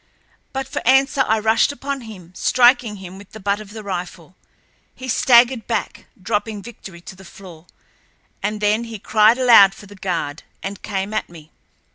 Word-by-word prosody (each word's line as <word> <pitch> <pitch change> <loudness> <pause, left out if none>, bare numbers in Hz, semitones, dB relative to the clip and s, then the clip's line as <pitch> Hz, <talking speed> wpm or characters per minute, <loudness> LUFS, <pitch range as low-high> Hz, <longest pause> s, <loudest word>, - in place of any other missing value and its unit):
But 270 0 -4
for - - -4
answer 270 +2 +3
I 220 - +2
rushed 220 +4 +2
upon 280 -1 -5
him, 185 -7 -12
striking 245 +1 +3
him 190 -1 -10
with 200 - -16
the 220 - -9
butt 200 0 -1
of 215 -2 -11
the 215 +1 -9
rifle. 180 -2 -6 0.6
He 260 - -9
staggered 240 -1 +4
back, - - -4
dropping 210 +1 -3
Victory 190 -6 -11
to 185 - -11
the 190 - -15
floor, 180 -3 -14 0.7
and 210 +1 -3
then 210 +3 +1
he 230 -1 -8
cried 215 +3 +3
aloud 225 -6 +6
for 205 - -13
the 205 - -14
guard, 170 -6 -4 0.2
and 195 +1 -6
came 200 0 -4
at 215 - -2
me. 160 -2 -15
210 Hz, 175 wpm, -20 LUFS, 190-235 Hz, 0.7 s, aloud